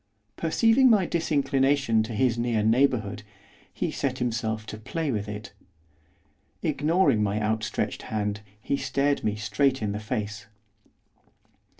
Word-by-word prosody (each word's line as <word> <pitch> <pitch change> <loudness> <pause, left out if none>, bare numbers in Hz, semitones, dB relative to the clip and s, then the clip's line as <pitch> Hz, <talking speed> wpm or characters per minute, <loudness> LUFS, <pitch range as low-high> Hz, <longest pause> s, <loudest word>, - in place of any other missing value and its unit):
Perceiving 225 +10 +4
my 210 -5 +4
disinclination 140 -7 +1
to 110 +1 -4
his 120 +1 +2
near 115 -2 0
neighbourhood, 110 -3 +2 0.5
he - - -2
set - - -2
himself 110 -3 -2
to 110 - -8
play 155 +6 -3
with 105 -3 -3
it. 105 0 -7 1.1
Ignoring 150 - +2
my 105 0 0
outstretched 110 0 -1
hand, 105 -1 -3 0.2
he 140 +6 -1
stared 140 +2 0
me 105 -1 0
straight 130 +6 +1
in 105 -2 -2
the 105 - -3
face. 105 -1 -4
115 Hz, 125 wpm, -26 LUFS, 105-140 Hz, 1.1 s, Perceiving